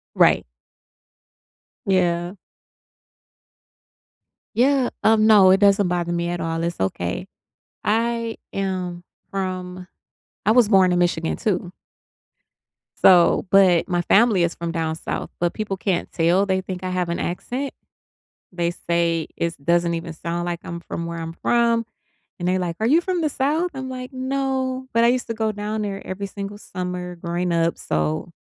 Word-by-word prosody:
Right. -, -, +4 dB, 1.4 s
Yeah. 175 Hz, -1 st, +1 dB, 2.2 s
Yeah, 260 Hz, +1 st, +3 dB
um, 220 Hz, 0 st, +5 dB
no, 200 Hz, -4 st, +7 dB
it 190 Hz, -, +5 dB
doesn't 200 Hz, -1 st, +4 dB
bother 175 Hz, -1 st, -1 dB
me 170 Hz, 0 st, -1 dB
at 175 Hz, -1 st, -3 dB
all, 165 Hz, 0 st, -2 dB
it's 170 Hz, 0 st, -3 dB
okay. 90 Hz, -2 st, -2 dB, 0.6 s
I 230 Hz, +1 st, 0 dB, 0.2 s
am 185 Hz, -3 st, -3 dB, 0.3 s
from 185 Hz, -1 st, -4 dB, 0.6 s
I 215 Hz, -, +6 dB
was 235 Hz, -2 st, +5 dB
born 190 Hz, -3 st, +5 dB
in 175 Hz, -, +2 dB
Michigan 170 Hz, -2 st, 0 dB
too. 180 Hz, -5 st, -1 dB, 1.3 s
So 180 Hz, +1 st, +6 dB
but 185 Hz, -4 st, +5 dB
my 175 Hz, -1 st, 0 dB
family 200 Hz, 0 st, +4 dB
is 170 Hz, 0 st, 0 dB
from 170 Hz, 0 st, -4 dB
down 160 Hz, -2 st, -2 dB
south, 160 Hz, -, -4 dB
but 175 Hz, 0 st, 0 dB
people 210 Hz, -3 st, -3 dB
can't 185 Hz, -2 st, -1 dB
tell, 175 Hz, +4 st, +2 dB
they 190 Hz, -1 st, +1 dB
think 185 Hz, -1 st, -6 dB
I 185 Hz, -, -2 dB
have 180 Hz, -1 st, -1 dB
an 170 Hz, -, -2 dB
accent. 250 Hz, +10 st, -3 dB, 0.8 s
They 175 Hz, -2 st, -1 dB
say 170 Hz, -2 st, 0 dB
it's 170 Hz, 0 st, -2 dB
doesn't 170 Hz, +3 st, +1 dB
even 165 Hz, 0 st, -5 dB
sound 170 Hz, +2 st, -4 dB
like 175 Hz, -1 st, -3 dB
I'm 170 Hz, 0 st, -6 dB
from 170 Hz, 0 st, -5 dB
where 170 Hz, 0 st, -5 dB
I'm 165 Hz, 0 st, -5 dB
from, 235 Hz, +4 st, +2 dB, 0.6 s
and 175 Hz, -, -2 dB
they're 185 Hz, +1 st, +2 dB
like, 175 Hz, -2 st, -3 dB
"Are 220 Hz, -, +1 dB
you 315 Hz, +6 st, +4 dB
from 360 Hz, -1 st, -1 dB
the 310 Hz, -, +1 dB
South?" 300 Hz, +6 st, 0 dB
I'm 265 Hz, -1 st, -5 dB
like, 255 Hz, +1 st, -6 dB
"No, 260 Hz, 0 st, -2 dB
but 230 Hz, +1 st, +4 dB
I -, -, +6 dB
used 250 Hz, +1 st, +1 dB
to 230 Hz, -, -3 dB
go 220 Hz, -1 st, 0 dB
down 210 Hz, +1 st, -3 dB
there 200 Hz, -1 st, -5 dB
every 195 Hz, +2 st, -4 dB
single 200 Hz, +1 st, -6 dB
summer 180 Hz, -2 st, -5 dB
growing 175 Hz, +1 st, -2 dB
up, 165 Hz, 0 st, +1 dB
so 75 Hz, 0 st, -2 dB
185 Hz, 160 wpm, -22 LUFS, 170-220 Hz, 2.2 s, no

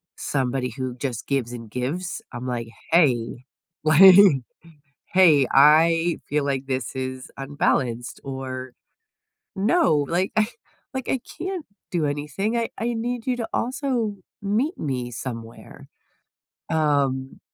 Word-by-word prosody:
somebody 130 Hz, -2 st, -1 dB
who 130 Hz, -2 st, -3 dB
just 125 Hz, -3 st, -4 dB
gives 135 Hz, -4 st, -1 dB
and 115 Hz, -2 st, -8 dB
gives. 145 Hz, -, -3 dB
I'm 125 Hz, +1 st, -6 dB
like, 120 Hz, -2 st, -3 dB, 0.2 s
"Hey, 130 Hz, -7 st, +2 dB, 0.4 s
like 175 Hz, +5 st, +8 dB, 1.0 s
hey, 160 Hz, -8 st, +6 dB
I 165 Hz, +4 st, +5 dB
feel 145 Hz, 0 st, 0 dB
like 135 Hz, -1 st, -1 dB
this 130 Hz, -1 st, -3 dB
is 130 Hz, 0 st, -5 dB
unbalanced," 135 Hz, -4 st, -1 dB
or, 130 Hz, -1 st, -6 dB, 0.9 s
"No, 195 Hz, -, +3 dB
like, 180 Hz, +3 st, 0 dB
I 215 Hz, 0 st, +3 dB, 0.5 s
like, 260 Hz, -1 st, -4 dB
I 265 Hz, -, 0 dB, 0.2 s
can't 365 Hz, -3 st, -4 dB, 0.2 s
do 165 Hz, -4 st, 0 dB
anything, 150 Hz, -, -2 dB
I 230 Hz, -1 st, 0 dB
I 235 Hz, +2 st, -1 dB
need 235 Hz, +1 st, -3 dB
you 255 Hz, -1 st, +1 dB
to 230 Hz, -2 st, -4 dB
also 245 Hz, -4 st, -1 dB, 0.3 s
meet 230 Hz, -, 0 dB
me 125 Hz, -4 st, -3 dB
somewhere." 115 Hz, -1 st, -8 dB, 0.8 s
Um, 140 Hz, -4 st, 0 dB
145 Hz, 125 wpm, -24 LUFS, 130-195 Hz, 1.0 s, like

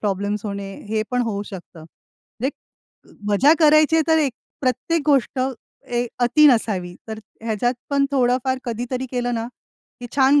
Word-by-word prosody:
Problems 205 Hz, +1 st, -2 dB
होणे 200 Hz, -1 st, -5 dB, 0.2 s
हे 215 Hz, 0 st, 0 dB
पण 250 Hz, 0 st, +1 dB
होऊ 200 Hz, -1 st, -2 dB
शकतं. 175 Hz, -4 st, -10 dB, 0.6 s
एक 275 Hz, -, +1 dB, 0.8 s
मजा 260 Hz, +10 st, +5 dB
करायची 310 Hz, 0 st, +5 dB
आहे 320 Hz, -, +4 dB
तर 320 Hz, 0 st, +5 dB
एक 285 Hz, -4 st, +1 dB, 0.3 s
प्रत्येक 265 Hz, +5 st, 0 dB
गोष्ट 270 Hz, -3 st, +2 dB
अ, 255 Hz, +1 st, +1 dB, 0.4 s
एक 240 Hz, 0 st, -1 dB
अति 300 Hz, +5 st, +5 dB
नसावी 200 Hz, -8 st, +2 dB
तर 220 Hz, 0 st, -5 dB, 0.2 s
ह्याच्यात 230 Hz, +2 st, 0 dB, 0.2 s
पण 280 Hz, 0 st, +3 dB
थोडंफार 260 Hz, 0 st, +1 dB
कधीतरी 245 Hz, +2 st, -3 dB
केलं 245 Hz, -1 st, -1 dB
ना, 225 Hz, -, -2 dB, 0.6 s
ही 245 Hz, -, -6 dB
छान 275 Hz, +2 st, +5 dB
245 Hz, 155 wpm, -22 LUFS, 215-275 Hz, 0.8 s, मजा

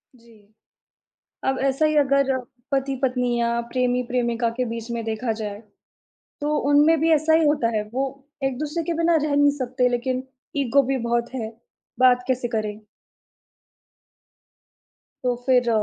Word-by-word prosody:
जी। 225 Hz, -3 st, -22 dB, 0.9 s
अब 265 Hz, 0 st, +1 dB
ऐसा 275 Hz, +3 st, +2 dB
ही 305 Hz, 0 st, +1 dB
अगर 275 Hz, -1 st, +3 dB, 0.4 s
पति-पत्नी 260 Hz, -3 st, 0 dB
या 235 Hz, 0 st, +1 dB
प्रेमी-प्रेमिका 245 Hz, -2 st, 0 dB
के 255 Hz, -, +2 dB
बीच 230 Hz, 0 st, -6 dB
में 235 Hz, -1 st, -2 dB
देखा 225 Hz, +1 st, -2 dB
जाए, 205 Hz, -1 st, -5 dB, 0.8 s
तो 300 Hz, +1 st, 0 dB
उनमें 300 Hz, +3 st, +5 dB
भी 325 Hz, +1 st, +3 dB
ऐसा 315 Hz, +1 st, +3 dB
ही 320 Hz, 0 st, +4 dB
होता 290 Hz, -6 st, +2 dB
है, 210 Hz, -, +1 dB
वो 270 Hz, +1 st, -3 dB, 0.2 s
एक-दूसरे 300 Hz, +5 st, -2 dB
के 340 Hz, -, -1 dB
बिना 335 Hz, +1 st, +3 dB
रह 300 Hz, -1 st, 0 dB
नहीं 290 Hz, 0 st, +5 dB
सकते, 255 Hz, -1 st, +1 dB
लेकिन 250 Hz, +1 st, -1 dB, 0.3 s
ईगो 280 Hz, 0 st, +3 dB
भी -, -, +1 dB
बहुत 235 Hz, +1 st, -1 dB
है, 225 Hz, -4 st, -3 dB, 0.5 s
बात 250 Hz, -1 st, +4 dB
कैसे 255 Hz, -2 st, 0 dB
करें? 215 Hz, -3 st, -3 dB, 2.5 s
तो 250 Hz, -1 st, +1 dB
फिर, 250 Hz, -2 st, +3 dB
255 Hz, 140 wpm, -23 LUFS, 235-280 Hz, 2.5 s, उनमें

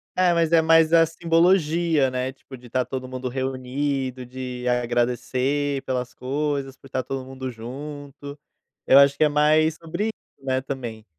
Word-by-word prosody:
É, 180 Hz, -1 st, +3 dB
mas 165 Hz, -1 st, +1 dB
é 165 Hz, -1 st, +6 dB
mais 165 Hz, 0 st, +5 dB
a 165 Hz, -1 st, +7 dB
simbologia, 165 Hz, -2 st, +2 dB
né, 130 Hz, +1 st, -3 dB
tipo, 135 Hz, 0 st, -13 dB
de 120 Hz, 0 st, -15 dB
tá 130 Hz, +2 st, +1 dB
todo 130 Hz, 0 st, -5 dB
mundo 130 Hz, 0 st, -5 dB
reunido 130 Hz, 0 st, -3 dB
de 125 Hz, 0 st, -6 dB
agradecer 125 Hz, +3 st, 0 dB
pelas 125 Hz, -1 st, -3 dB
coisas, 140 Hz, 0 st, -3 dB
por 135 Hz, -, -17 dB
tá 130 Hz, 0 st, -2 dB
todo 135 Hz, +1 st, -4 dB
mundo 130 Hz, 0 st, -6 dB
junto. 140 Hz, +4 st, -8 dB, 0.5 s
Eu 135 Hz, -, +7 dB
acho 140 Hz, 0 st, +5 dB
que 155 Hz, -, +3 dB
é 150 Hz, -, +4 dB
mais 155 Hz, +2 st, +3 dB
sobre 170 Hz, +5 st, -4 dB
isso, 145 Hz, -10 st, -11 dB
né, 130 Hz, 0 st, 0 dB
também. 120 Hz, -5 st, -6 dB
135 Hz, 165 wpm, -23 LUFS, 130-150 Hz, 0.5 s, a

